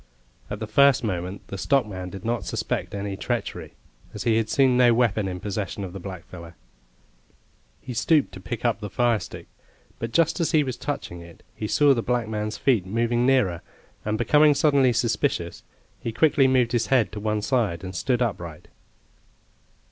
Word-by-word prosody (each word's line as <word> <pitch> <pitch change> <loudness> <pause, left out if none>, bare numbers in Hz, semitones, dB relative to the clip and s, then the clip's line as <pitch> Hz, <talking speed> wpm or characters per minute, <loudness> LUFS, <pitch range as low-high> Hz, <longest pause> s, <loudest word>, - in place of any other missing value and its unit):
At 105 - -4
the 110 - -3
first 135 +4 +4
moment 95 -2 -4
the 100 - -6
stockman 100 -6 0
did 95 +2 -9
not 120 +1 -1
suspect - - -3
any 100 0 -3
treachery, - - -4 0.4
as 105 - -4
he 115 -2 +2
had 110 -1 0
seen 135 -3 +3
no 120 -2 +5
weapon 110 -4 +1
in 90 -1 -4
possession 100 0 -4
of 90 -2 -6
the 95 - -6
blackfellow. 85 -2 -9 1.3
He 125 - -7
stooped 145 +5 +2
to 95 - -10
pick 120 +6 -6
up 115 -2 +1
the 105 -2 -6
firestick; 120 0 -1 0.5
but 115 0 -4
just 165 +4 +2
as 165 +1 0
he 155 -2 +5
was 130 -3 -4
touching 130 -12 -5
it, 85 0 -14
he 105 - -4
saw 145 +5 +4
the 120 - -1
black 120 -1 -1
man's 105 0 -3
feet 115 -9 +1
moving 120 +4 +1
nearer, 100 -11 +2 0.4
and 105 0 -1
becoming 150 +6 +4
suddenly 140 -3 +4
suspicious, 115 0 -1 0.4
he 115 - -4
quickly 135 +2 +3
moved 125 -3 +2
his 120 -2 0
head 120 -8 +2
to 105 - -6
one 105 0 -1
side 110 -9 0
and 95 -1 -6
stood 125 +6 +1
upright. 85 -8 -5
115 Hz, 180 wpm, -24 LUFS, 100-125 Hz, 1.3 s, no